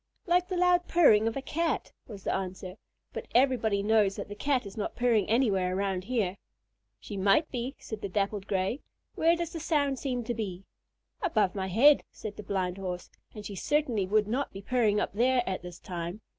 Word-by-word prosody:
"Like 355 0 +2
the 370 - -2
loud 355 0 +3
purring 225 -11 +5
of 225 - -2
a 270 - -4
Cat," 325 0 -1 0.2
was 200 -4 -10
the - - 0
answer, 185 0 -5 0.4
"but - - -6
everybody 235 -6 +3
knows 210 -2 +3
that - - -6
the - - -5
Cat 255 +3 0
is 195 - -9
not 210 - -4
purring 235 -5 +2
anywhere 195 -6 +2
around 190 -2 -1
here." 210 -5 -1 0.6
"She 205 - -8
might 200 - +3
be," 255 +2 -3
said 220 -2 -7
the 200 - -4
Dappled 200 +1 -1
Gray. 195 +7 -1 0.3
"Where 330 +1 +3
does 340 -1 -4
the 330 - -4
sound 285 -5 0
seem 250 -3 -2
to 240 - -2
be?" 195 -5 -5 0.6
"Above 220 - +1
my 190 -2 -3
head," 265 +10 +5
said 210 -1 -8
the - - -7
Blind 190 -2 -2
Horse; 180 -2 -5 0.2
"and 210 -1 -8
she 205 - -6
certainly 240 -2 0
would 210 +1 +2
not 255 +5 -1
be 195 0 -9
purring 220 -3 +2
up - - -2
there 250 +3 +3
at 190 -1 -2
this 175 -1 -9
time. 175 +3 -6
215 Hz, 200 wpm, -29 LUFS, 195-265 Hz, 0.6 s, purring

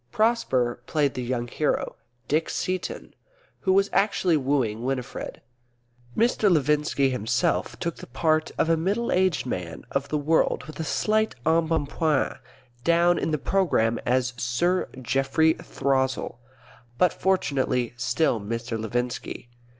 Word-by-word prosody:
Prosper 135 - +1
played 145 -4 +1
the 125 - -4
young 120 -1 -2
hero, 150 +5 -1 0.3
Dick 155 +2 +1
Seaton, 185 -1 -3 0.5
who 190 - +1
was 195 +1 +4
actually 195 -4 +2
wooing 130 -6 0
Winifred. 130 0 -4 0.8
Mr. 225 -2 +3
Levinski 150 -3 +2
himself 115 -4 0
took 170 -1 -3
the - - -10
part 155 +4 +1
of - - +2
a 165 - +4
middle 200 +9 -1
aged 185 -6 +2
man 90 -9 -5
of 140 0 -1
the 150 - 0
world 150 -2 +1
with 155 +2 -10
a - - -1
slight 215 +7 +1
embonpoint; 160 -2 +1 0.4
down 170 +2 +4
in - - -1
the 155 - +1
programme 140 -9 +1
as 125 0 +1
Sir 175 +10 0
Geoffrey 135 +6 +2
Throssell, 130 -3 -1 0.6
but 180 +6 +3
fortunately 130 -10 0
still 120 0 +1
Mr. 115 +2 -4
Levinski. 120 +1 -3
145 Hz, 130 wpm, -25 LUFS, 125-170 Hz, 0.8 s, was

